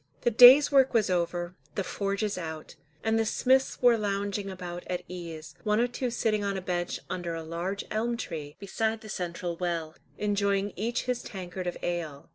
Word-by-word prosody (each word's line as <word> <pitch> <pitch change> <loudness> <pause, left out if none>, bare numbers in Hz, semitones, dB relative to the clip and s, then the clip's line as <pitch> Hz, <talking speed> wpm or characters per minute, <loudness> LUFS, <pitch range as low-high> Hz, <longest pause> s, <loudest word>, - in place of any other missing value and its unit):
The 240 - +2
day's 250 +6 +9
work 270 -2 +4
was 215 -4 +3
over, 175 0 -1 0.2
the 195 - 0
forges 200 +2 -2
out, 160 -3 -6 0.3
and 225 0 +2
the - - +3
smiths 260 +4 +2
were 240 -2 +6
lounging 200 -1 -2
about 180 -2 -6
at 180 0 -3
ease, 170 -3 -8
one 210 0 +2
or 240 - +4
two 245 +1 -3
sitting 220 -3 0
on 200 -1 -1
a - - -1
bench 175 -1 -2
under 175 -2 -3
a 165 - -5
large 175 +5 -4
elm 235 +2 0
tree 150 -8 -6
beside 220 +2 -2
the 215 - -11
central 175 -2 -4
well, 170 -3 -2 0.2
enjoying 200 -1 0
each 230 +5 -1
his 250 -1 -1
tankard 185 -1 -6
of 175 - -3
ale. 165 -5 -4
195 Hz, 185 wpm, -28 LUFS, 175-220 Hz, 0.3 s, day's